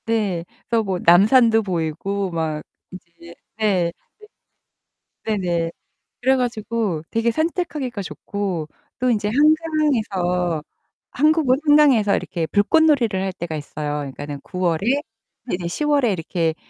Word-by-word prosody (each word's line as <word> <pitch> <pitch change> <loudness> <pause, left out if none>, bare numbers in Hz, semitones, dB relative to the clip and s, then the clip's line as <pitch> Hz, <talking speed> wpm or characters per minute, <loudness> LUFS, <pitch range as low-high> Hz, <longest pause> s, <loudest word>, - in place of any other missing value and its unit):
네, 205 -7 -1 0.2
그래서 230 -1 +1
뭐 190 -3 -2
남산도 225 +6 +6
보이고 185 +2 -2
막 160 -2 -2 0.3
이제 170 -2 -13 0.2
네. 185 -6 +1 1.3
네. 220 - 0
네네. 170 -3 -1 0.5
그래 265 +2 +4
가지고 225 -8 -2
되게 230 +1 +1
산책하기가 300 - -2
좋고 190 -3 -4 0.3
또 255 - +1
인제 210 -3 +1
한강에서 230 - +1 0.5
한국은 300 -2 +3
한강에서 275 -9 +5
이렇게 165 -3 -3
불꽃놀이를 235 - +3
할 190 0 -1
때가 170 -2 -5
있어요. 150 0 -4
그니까는 145 +1 -6
9월에 185 - 0 0.5
이제 175 -1 -2
10월에 285 - +1
이렇게 165 -2 -1
200 Hz, 260 characters per minute, -21 LUFS, 170-250 Hz, 1.3 s, 남산도